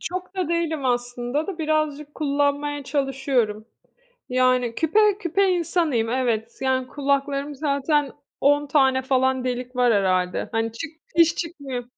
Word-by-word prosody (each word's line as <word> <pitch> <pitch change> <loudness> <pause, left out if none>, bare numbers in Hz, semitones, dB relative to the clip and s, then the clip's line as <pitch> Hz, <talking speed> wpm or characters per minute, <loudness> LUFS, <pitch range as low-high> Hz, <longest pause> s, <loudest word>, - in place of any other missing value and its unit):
Çok 365 +2 -6
da 365 -4 -1
değilim 325 -4 -1
aslında 245 +3 -1
da 380 -4 -5
birazcık 305 -2 -1
kullanmaya 285 0 0
çalışıyorum. 265 -6 -1 0.6
Yani, 255 -2 +2
küpe 415 +5 +3
küpe 390 +1 +1
insanıyım, 330 -10 0
evet. 235 -3 -1
Yani, 260 -1 0
kulaklarım 280 +1 -1
zaten 285 0 0 0.3
10 290 +1 +3
tane 265 -2 +3
falan 260 0 +1
delik 250 0 -4
var 245 -2 +3
herhâlde. 185 -2 +1
Hani, 225 0 -1
çık 310 +7 -6 0.3
hiç 335 0 +5
çıkmıyor. 285 -7 -5
275 Hz, 130 wpm, -23 LUFS, 250-310 Hz, 0.6 s, hiç